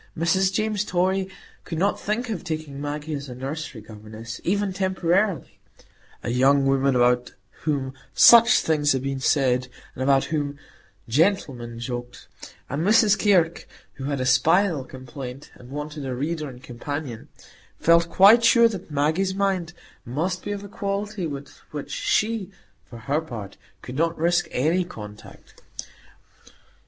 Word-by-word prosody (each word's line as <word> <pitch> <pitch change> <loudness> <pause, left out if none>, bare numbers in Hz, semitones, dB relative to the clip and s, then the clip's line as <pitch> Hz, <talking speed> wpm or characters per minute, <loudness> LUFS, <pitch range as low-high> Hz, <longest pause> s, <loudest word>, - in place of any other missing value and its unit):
Mrs 190 +4 +2
James 215 0 0
Torry 190 0 0 0.3
could 165 - -5
not 195 +5 +1
think 225 +3 -2
of 190 -5 -4
taking 155 -5 -5
Maggie 150 +1 -4
as 140 -1 -5
a 125 - -7
nursery 135 -2 -6
governess, 110 +2 -10
even 200 +1 0
temporarily,—a 185 - -3
young 135 +3 +4
woman 135 0 +2
about 125 0 +2 0.3
whom 135 -4 -1 0.2
"such 235 0 +7
things 145 -2 +2
had 130 -1 -2
been 135 -1 -2
said," 130 -3 +2 0.3
and - - -8
about 135 0 +3
whom 145 -2 -3 0.5
"gentlemen 130 - 0
joked"; 120 0 -6 0.4
and 140 +4 -2
Miss 210 +1 +5
Kirke, 180 -6 +2 0.3
who 135 - -8
had 140 -1 -2
a 130 - -1
spinal 155 +4 +3
complaint, 130 +1 -9
and 125 - -15
wanted 150 +1 -6
a 130 -2 -3
reader 155 +3 -3
and 125 0 -13
companion, 130 0 -6 0.5
felt 170 0 +4
quite 210 +7 +7
sure 235 0 +6
that 200 -8 -6
Maggie's 160 +6 0
mind 190 -4 0 0.3
must 170 +9 -3
be 205 - -4
of 200 0 -4
a - - -8
quality 200 -2 -3
with 140 -2 -8
which 145 -2 -7
she, 215 -3 0 0.3
for 120 - -12
her 140 +7 -1
part, 110 -10 -8 0.3
could 125 +1 -7
not 165 +1 +1
risk 175 +2 +2
any 165 +8 +1
contact. 105 - -12
150 Hz, 145 wpm, -24 LUFS, 130-190 Hz, 0.5 s, such